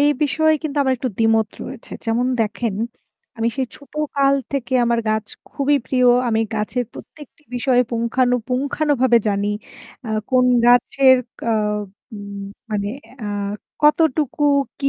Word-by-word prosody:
এই 290 0 +5
বিষয়ে 315 +2 +3
কিন্তু 300 -2 -4
আমার 265 -1 +2
একটু 255 - -2
দ্বিমত 225 -1 +3 0.2
রয়েছে - - -9
যেমন 235 +2 +1
দেখেন 225 0 -1 0.6
আমি 225 +1 +1
সেই 265 -1 0
ছোটকাল 285 -1 0 0.2
থেকে 270 -2 -3
আমার 235 0 +1
গাছ 215 0 0 0.3
খুবই 285 +1 +2
প্রিয় 255 -1 +2 0.2
আমি 225 -1 +1
গাছের 220 +4 -1
প্রত্যেকটি 295 -1 -13
বিষয়ে 245 0 +3
পুঙ্খানু, 240 +2 +1
পুঙ্খানুভাবে 260 -1 +2
জানি। 200 0 0 0.6
আহ 220 -1 -1
কোন 255 -1 +4 0.2
গাছের 260 +2 +5 0.3
আ - - +3 0.6
উ - - -6 0.5
মানে 205 -1 -1 0.4
আ - - -3 0.6
কতটুকু 300 -1 +2 0.4
কি 275 - +2
255 Hz, 135 wpm, -20 LUFS, 230-280 Hz, 0.6 s, এই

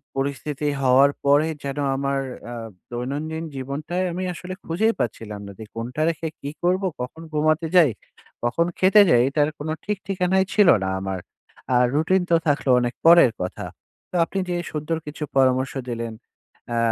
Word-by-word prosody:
পরিস্থিতি 140 +2 -2
হওয়ার 135 +2 +5
পরে 145 +3 +4 0.2
যেন 140 0 -4 0.2
আমার 140 0 -1 0.3
আ - - -5 0.4
দৈনন্দিন 145 +7 -4
জীবনটায় 150 +7 -3
আমি 180 +2 -3
আসলে 180 +2 -7
বুঝেই 220 +8 +2
পাচ্ছিলাম 105 -3 -3
না - - -8
যে, - - -6
কোনটা 120 +6 -4
রেখে 165 0 -3
কী 140 - -4
করবো, 185 +2 +2
কখন 125 +6 -6
ঘুমাতে 155 +2 +2
যাই, 165 -7 +7 0.5
কখন 125 +8 +1
খেতে 195 +3 +7
যাই? 120 - +6
এটার 145 +1 +2
কোনো 155 +2 -3
ঠিক 210 -1 -1
ঠিকানাই 190 0 +2
ছিল 210 -3 +5 0.2
না 95 - -1
আমার। 95 -1 -3 0.5
আ - - +4 0.2
রুটিন 165 +6 +2
তো - - +6
থাকলো 145 -2 +1
অনেক 120 0 -1
পরের 170 -6 +8
কথা। 90 - -4 0.4
তো - - -8
আপনি 195 - -3
যে 175 - 0 0.2
সুন্দর 155 +2 -2
কিছু 150 +1 -6
পরামর্শ 130 0 +3 0.2
দিলেন 115 -1 -4 0.6
আ - - 0
150 Hz, 165 wpm, -23 LUFS, 130-170 Hz, 0.6 s, পরের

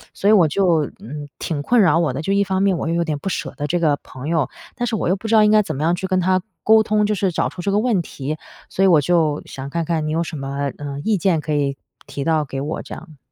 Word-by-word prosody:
所 200 - -1
以 215 - +7
我 175 -6 +6
就， 165 -3 +2
嗯， 145 +4 -7
挺 150 -4 -3
困 240 +8 +3
扰 165 -1 +4
我 155 -7 +1
的， 145 +4 -4
就 195 - 0
一 200 0 +3
方 190 0 0
面 195 -2 +3
我 - - -3
又 165 - 0
有 170 - +1
点 150 -3 -3
不 195 - -3
舍 - - -4
得 145 0 -2
这 - - +2
个 150 -3 +3
朋 130 +3 -9
友， 160 -5 +1 0.3
但 245 -1 -2
是 225 - -1
我 185 - -1
又 190 - +3
不 220 - -7
知 225 - +3
道 215 - +7
应 210 - +4
该 215 0 +6
怎 195 - -4
么 145 - -3
样 170 +2 +2
去 190 +2 -4
跟 185 -1 +1
她 185 +1 +2 0.2
沟 220 0 +6
通， 210 0 +1
就 210 - +1
是 190 -1 +1
找 - - 0
出 180 - -8
这 200 - -1
个 205 - +2
问 220 -6 +1
题， 150 0 -5 0.3
所 195 - 0
以 - - +6
我 160 -5 +5
就 155 -1 +1
想 135 +1 -7
看 170 +2 -2
看 160 -2 -1
你 - - -2
有 165 +2 0
什 160 -2 -6
么， 140 0 -3
嗯， 145 -1 -6
意 215 -2 +2
见 170 -3 +1
可 150 0 -3
以 140 -2 0 0.3
提 140 - -5
到 155 -1 +1
给 135 0 -5
我 150 +3 -3
这 - - -9
样。 160 -4 -13
165 Hz, 325 characters per minute, -20 LUFS, 145-195 Hz, 0.3 s, 以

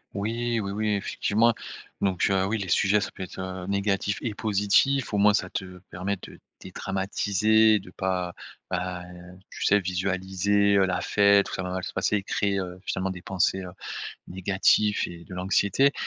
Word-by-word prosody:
Oui, 115 +3 -1
oui, 100 -2 -3
oui, 110 +2 -2
effectivement 110 +3 +1 0.5
donc 95 -2 +1
heu, 95 -1 +2
oui, 110 +4 0
les 95 -3 -5
sujets, 100 +3 +3
ça - - -4
peut - - -7
être, 95 - -9
heu, 95 -1 -5
négatif 100 0 0
et 115 - -2
positif. 105 +6 +2
Au - - +2
moins, 105 +1 +5
ça 95 -2 0
te 90 -1 -6
permet 95 +3 -2
de - - -11 0.2
dédramatiser, 100 +3 +2
de 90 - -13
pas, 90 -1 -2 0.4
bah, 90 0 -3 0.5
tu - - -4
sais, 105 - +5
visualiser, 95 +2 +1
heu, 95 - +5
la 95 -1 -1
fête, 100 -1 +4
tout - - -8
ça - - -2
va 90 - -4
mal 95 -1 -3
se - - -4
passer - - 0
et 100 - -1
créer, 100 -1 0
heu, 90 -1 -4
finalement, 95 +1 -1
des 95 -2 -6
pensées, 95 +1 0
heu, 90 - -8 0.6
négatifs 95 +3 +2
et 85 -1 -10
de 90 - -10
l'anxiété 100 +8 +2
95 Hz, 185 wpm, -26 LUFS, 95-105 Hz, 0.6 s, moins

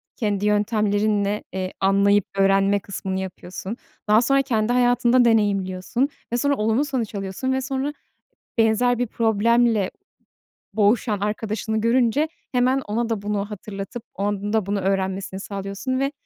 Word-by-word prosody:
kendi 205 -3 -1
yöntemlerinle, 210 -1 +1
eee, 185 0 -3
anlayıp 200 +1 +3
öğrenme 195 +1 +3
kısmını 190 -1 -4
yapıyorsun, 190 +3 -6 0.3
daha 210 +2 +5
sonra 275 +2 +3
kendi 235 -3 0
hayatında 245 0 +4
deneyimliyorsun 205 +2 +1 0.2
ve - - +2
sonra 285 +3 +2
olumlu 225 +5 +1
sonuç 245 -6 -3
alıyorsun 195 +6 -3
ve 265 - 0
sonra 270 +2 -2 0.7
benzer 230 +2 +3
bir 245 - 0
problemle 225 -1 +2 0.8
boğuşan 210 0 +2
arkadaşını 215 +1 -2
görünce 245 +6 +2 0.2
hemen 255 +1 +2
ona 230 +3 -1
da 225 -3 -2
bunu 205 -1 -1
hatırlatıp 205 +2 -7
onun 205 +1 -2
da 220 -4 +1
bunu 200 0 -1
öğrenmesini 190 0 -1
sağlıyorsun 200 +6 -4
ve 275 +1 0
210 Hz, 135 wpm, -23 LUFS, 200-240 Hz, 0.8 s, daha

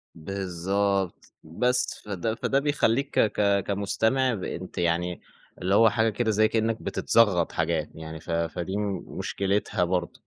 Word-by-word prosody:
بالضبط، 95 +2 -2
بس 125 +11 0
فده 105 +2 -2
فده 135 +3 +1
بيخلّيك 140 -2 +1
ك 110 - +4
ك 100 -1 +2
كمستمع 110 +6 +1
ب 95 -5 -5
أنت 90 +1 -6
يعني 85 +1 0 0.4
اللي 95 +2 +2
هو 115 +1 +7
حاجة 110 +1 +2
كده 110 +1 0
زي 110 +1 +4
كأنك 110 0 0
بتتزغط 100 -8 +2
حاجات، 80 -2 -1
يعني 80 0 -8
ف 80 - -15
فدي 85 +3 -2 0.3
مشكلتها 100 -1 -1
برضو. 90 +7 -2
100 Hz, 140 wpm, -26 LUFS, 85-110 Hz, 0.4 s, هو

